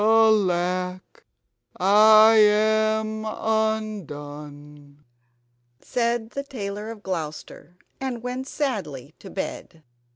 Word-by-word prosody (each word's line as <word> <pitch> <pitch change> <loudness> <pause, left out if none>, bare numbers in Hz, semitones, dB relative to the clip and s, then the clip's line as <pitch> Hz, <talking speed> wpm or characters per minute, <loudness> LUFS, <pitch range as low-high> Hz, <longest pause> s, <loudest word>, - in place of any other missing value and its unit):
"Alack, 185 -5 +1 0.5
I 215 +3 +7
am 215 +1 +2
undone!" 150 -10 -4 0.8
said 235 - -2
the 280 - -4
Tailor 210 -6 -6
of 220 -2 -10
Gloucester, 170 0 -6 0.2
and 255 -3 -4
went 250 +2 -5
sadly 165 - -4
to 195 - -11
bed. 165 -4 -7
210 Hz, 85 wpm, -24 LUFS, 175-220 Hz, 0.8 s, I